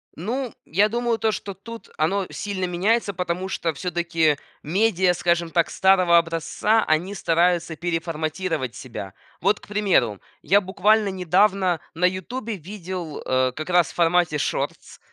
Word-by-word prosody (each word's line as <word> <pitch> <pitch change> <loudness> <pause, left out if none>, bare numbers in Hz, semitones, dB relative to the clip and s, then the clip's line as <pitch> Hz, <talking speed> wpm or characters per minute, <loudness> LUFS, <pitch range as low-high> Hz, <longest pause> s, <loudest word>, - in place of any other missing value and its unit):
Ну, 240 - -3
я 200 +6 +2
думаю 235 0 0
то, 220 0 +1
что 200 0 -5
тут 230 +4 -10
оно 185 +5 0
сильно 195 -2 -3
меняется, 200 +5 +1
потому 180 +1 -3
что 165 -4 -2
всё-таки 165 -2 0 0.2
медиа, 185 +1 +2
скажем 170 -1 0
так, 170 0 +1
старого 185 -3 +4
образца, 170 +6 +1
они 170 +6 +1
стараются 170 -1 +1
переформатировать 160 -4 -2
себя. 105 -7 -8 0.3
Вот, 205 +1 +2
к - - -17
примеру, 195 - +1 0.2
я 200 +3 +4
буквально 205 +2 +2
недавно 185 0 +2 0.2
на 175 +3 +2
"Ютубе" 210 +5 -2
видел, 180 -3 -7
э, 130 0 +2
как 155 +3 -6
раз 175 -2 +3
в - - -18
формате 170 -2 +2
шортс, - - -3
180 Hz, 145 wpm, -23 LUFS, 165-200 Hz, 0.3 s, старого